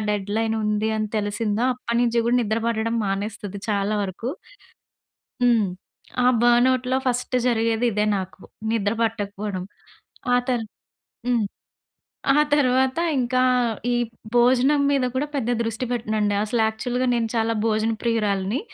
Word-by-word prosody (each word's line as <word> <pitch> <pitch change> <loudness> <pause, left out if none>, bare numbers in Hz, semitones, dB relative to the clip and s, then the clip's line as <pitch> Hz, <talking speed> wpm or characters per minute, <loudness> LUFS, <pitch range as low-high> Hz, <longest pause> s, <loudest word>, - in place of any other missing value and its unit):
Deadline 210 +2 -1
ఉంది 210 +1 0
అని 215 - -1
తెలిసిందో, 210 +2 -1
అప్పడినుంచి 235 -1 0
కూడా, 240 +1 +3
నిద్ర 220 +1 -1
పట్టడం 230 0 -1
మానేస్తుది 200 0 -4
చాలా 200 +1 0
వరకు. 200 +5 -4 1.2
హ్మ్. 235 -4 +4 0.6
ఆ - - +3 0.2
బర్నౌట్‌లో 250 +2 +3
ఫస్ట్ 250 0 0
జరిగేది 230 -1 +1
ఇదే 210 0 +1
నాకు. 190 0 -6 0.3
నిద్ర 210 -2 +1
పట్టకపోడం. 205 -3 -2 0.7
ఆ - - +6
తరు 240 -3 0 0.6
హ్మ్. 240 -4 +2 0.9
ఆ 295 - +4 0.2
తర్వాత 260 -1 +2 0.2
ఇంకా 255 0 +1 0.5
ఈ - - +2 0.4
భోజనం 255 +4 +4
మీద 275 -2 +2
కూడా 270 +3 0
పెద్ద 250 -4 -1
దృష్టి 225 +2 -3
పెట్టనండి. 215 -3 0
అసలు 225 +2 -1
యాక్చువల్‌గా 245 +3 -1
నేను 230 -1 0
చాలా 225 0 +1
భోజన 220 0 +1
ప్రియురాలిని. 210 -2 0
225 Hz, 125 wpm, -23 LUFS, 210-245 Hz, 1.2 s, ఆ